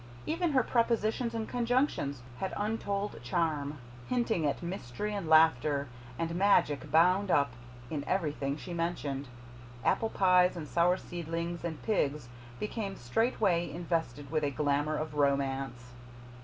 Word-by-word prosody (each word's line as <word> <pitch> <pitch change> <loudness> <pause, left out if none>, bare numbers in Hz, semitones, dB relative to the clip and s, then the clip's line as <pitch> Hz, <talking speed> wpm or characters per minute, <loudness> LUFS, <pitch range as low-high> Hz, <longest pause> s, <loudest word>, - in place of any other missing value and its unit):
Even 335 0 0
her 260 -2 +4
prepositions 230 0 +1
and 225 -1 -2
conjunctions 240 - 0 0.2
had 190 - -3
untold 205 - -2
charm, 150 +1 -1 0.3
hinting 230 -10 +1
at 145 - -2
mystery 175 +2 -4
and 200 -5 -3
laughter 150 -3 +4 0.3
and 165 +2 -2
magic 170 -6 +3
bound 180 +5 +4
up 140 -6 +3 0.4
in 150 -3 -2
everything 150 -6 -1
she 175 - -7
mentioned. 150 -5 -2 0.6
Apple 225 - +2
pies 180 -2 +4
and 155 -3 -5
sour 175 +3 +3
seedlings 170 0 -4
and 165 -2 -4
pigs 150 - 0 0.3
became 210 -2 -3
straightway 175 - +1
invested 160 -5 -3
with 155 -1 0
a 145 - +2
glamour 145 +1 0
of 155 0 -4
romance. 135 -3 0
170 Hz, 130 wpm, -31 LUFS, 145-200 Hz, 0.6 s, her